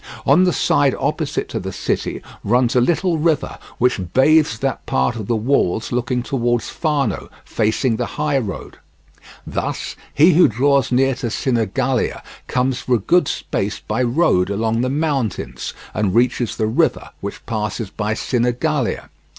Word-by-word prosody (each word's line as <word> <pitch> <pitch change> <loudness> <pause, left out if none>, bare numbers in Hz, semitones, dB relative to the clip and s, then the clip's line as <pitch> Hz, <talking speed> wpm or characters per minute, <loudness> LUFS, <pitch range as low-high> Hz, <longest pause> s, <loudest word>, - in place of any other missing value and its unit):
On 160 +7 +5
the 180 - +3
side - - +2
opposite - - -2
to - - -3
the - - -5
city - - -3 0.2
runs 120 +3 +2
a 125 - +5
little 170 +4 +1
river 160 -1 0 0.2
which 125 -5 +2
bathes 150 -2 +4
that 135 +2 -2
part 65 +7 +1
of 110 -4 -6
the 120 - +1
walls 110 -3 0
looking 125 0 -1
towards 120 -4 -1
Fano, 150 -4 -1 0.2
facing 110 +2 0
the - - -2
high 150 -2 +1
road. 100 -8 -6 0.7
Thus - - -3 0.2
he 165 +5 +5
who 175 +3 +6
draws 135 +3 +2
near 135 +2 +3
to 125 -2 -4
Sinigalia 125 +2 -1 0.2
comes 125 0 0
for 125 0 +1
a - - +3
good 160 - +2
space 105 +2 -2
by 110 +3 -2
road 120 - +2
along 110 +3 0
the 130 - 0
mountains, 130 - -2 0.2
and 100 -3 0
reaches 120 -1 +1
the 110 - +1
river 110 - 0
which - - -7
passes 105 -1 -3
by 105 0 -2
Sinigalia. 125 +3 -1
125 Hz, 155 wpm, -20 LUFS, 110-140 Hz, 0.7 s, who